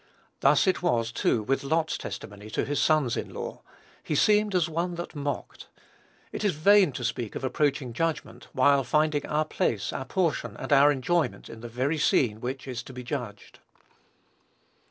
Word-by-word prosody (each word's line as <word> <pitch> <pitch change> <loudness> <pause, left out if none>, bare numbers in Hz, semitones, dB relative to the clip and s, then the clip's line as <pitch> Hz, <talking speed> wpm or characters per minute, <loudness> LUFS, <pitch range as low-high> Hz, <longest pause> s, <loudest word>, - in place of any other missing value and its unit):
Thus - - +4
it 190 - +1
was, 120 -9 +1
too, 115 -1 +1
with 135 +6 0
Lot's 160 +3 0
testimony 105 +1 -8
to - - -1
his 145 +1 -1
sons 150 -7 +2
in - - -4
law; - - -6 0.4
"he 150 - -3
seemed 210 +4 +3
as 175 -3 +3
one 170 +2 -2
that 170 0 -6
mocked." 145 -1 -5 0.6
It - - -5
is 205 -6 +1
vain 195 +2 +5
to 120 - -5
speak 120 -2 -3
of - - -5
approaching 135 -2 0
judgment, 165 +5 -3
while 140 +1 +4
finding 150 +3 +1
our 155 +1 0
place, 110 -8 -1
our 130 - -4
portion, 175 -3 -1
and - - -1
our 140 +1 +7
enjoyment, 155 +5 -1
in 110 - -10
the 120 - -6
very 130 +7 -1
scene 110 -6 +2
which 130 +2 -5
is 125 -2 -4
to 130 - -12
be 125 0 -7
judged. 120 -6 -6
140 Hz, 175 wpm, -27 LUFS, 125-160 Hz, 0.6 s, our